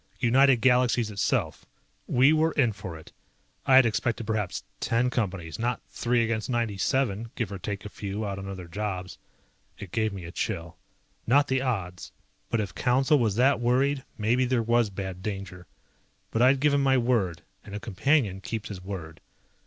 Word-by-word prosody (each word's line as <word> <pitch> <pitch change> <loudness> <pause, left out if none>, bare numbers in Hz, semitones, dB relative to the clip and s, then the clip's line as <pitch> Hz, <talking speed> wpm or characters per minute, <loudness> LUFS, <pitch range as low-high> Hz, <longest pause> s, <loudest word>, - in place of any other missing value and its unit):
United 130 0 +4
Galaxies 125 -3 +3
itself. 100 - -1 0.4
We 135 +5 +5
were 160 +1 +2
in 120 -6 +2
for 95 -5 -7
it. 80 - -14 0.6
I 130 - +6
had 130 -1 +8
expected 115 0 -1
perhaps 105 -4 -2 0.2
ten 120 +2 +1
Companies, 95 -8 -3
not 120 +2 -1
three 120 0 +1
against 115 0 -2
97, 115 0 0
give 115 -5 -3
or 100 - -5
take 100 -1 -5
a - - -5
few 100 +1 -5
out 100 -1 -4
on 95 - -7
other 95 -3 -7
jobs. 95 -1 -5 0.6
It 100 -3 -9
gave 110 -2 0
me 95 -3 -7
a 85 - -7
chill. 85 -1 -4 0.5
Not 145 +4 +4
the 130 0 +1
odds, 95 -9 -3 0.4
but 115 - 0
if 100 -3 -3
Council 135 +4 +2
was 110 -5 +1
that 130 +4 +3
worried 130 +3 +1
maybe 115 +4 +2
there 125 -2 +1
was 120 -1 +2
bad 95 -2 -6
danger. 95 -3 -6 0.6
But 115 - 0
I'd 130 +2 +5
given 145 0 +3
my 135 -1 +3
word 115 -9 0 0.2
and 100 - -9
a - - -3
Companion 110 -1 +1
keeps 110 +1 -5
his 95 -3 -7
word. 85 -5 -7
115 Hz, 175 wpm, -27 LUFS, 95-125 Hz, 0.6 s, had